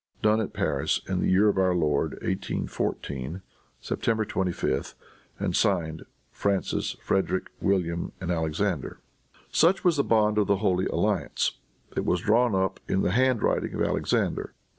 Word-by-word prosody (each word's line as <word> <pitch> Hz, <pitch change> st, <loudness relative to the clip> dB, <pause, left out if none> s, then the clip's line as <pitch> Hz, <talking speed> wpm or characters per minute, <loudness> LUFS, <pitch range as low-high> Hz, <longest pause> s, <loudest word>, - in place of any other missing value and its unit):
Done 110 Hz, +1 st, +4 dB
at 105 Hz, -, -3 dB
Paris, -, -, 0 dB
in -, -, -1 dB
the -, -, +1 dB
year 95 Hz, +3 st, +5 dB
of 100 Hz, -2 st, +2 dB
our 95 Hz, -1 st, +3 dB
Lord, 75 Hz, -4 st, +1 dB
1814, 85 Hz, -4 st, -3 dB, 0.4 s
September 110 Hz, -1 st, 0 dB
25, 95 Hz, -3 st, -2 dB, 0.4 s
and -, -, -1 dB
signed, 80 Hz, -5 st, 0 dB, 0.3 s
Francis, 100 Hz, -1 st, -1 dB
Frederic 95 Hz, -1 st, 0 dB
William 85 Hz, -4 st, 0 dB
and 90 Hz, -2 st, -3 dB
Alexander." 80 Hz, 0 st, -1 dB, 0.5 s
Such 180 Hz, +4 st, +3 dB
was 175 Hz, -4 st, +3 dB
the 140 Hz, -, +3 dB
bond 105 Hz, -3 st, +3 dB
of 105 Hz, -, +2 dB
the 100 Hz, -, +3 dB
Holy 95 Hz, -2 st, +1 dB
Alliance. 85 Hz, -2 st, 0 dB, 0.4 s
It -, -, 0 dB
was 90 Hz, -, +1 dB
drawn 115 Hz, +1 st, +3 dB
up 95 Hz, 0 st, 0 dB
in 95 Hz, -, +1 dB
the -, -, +1 dB
hand 125 Hz, +1 st, +2 dB
writing -, -, 0 dB
of -, -, 0 dB
Alexander. -, -, 0 dB
95 Hz, 150 wpm, -27 LUFS, 85-105 Hz, 0.5 s, year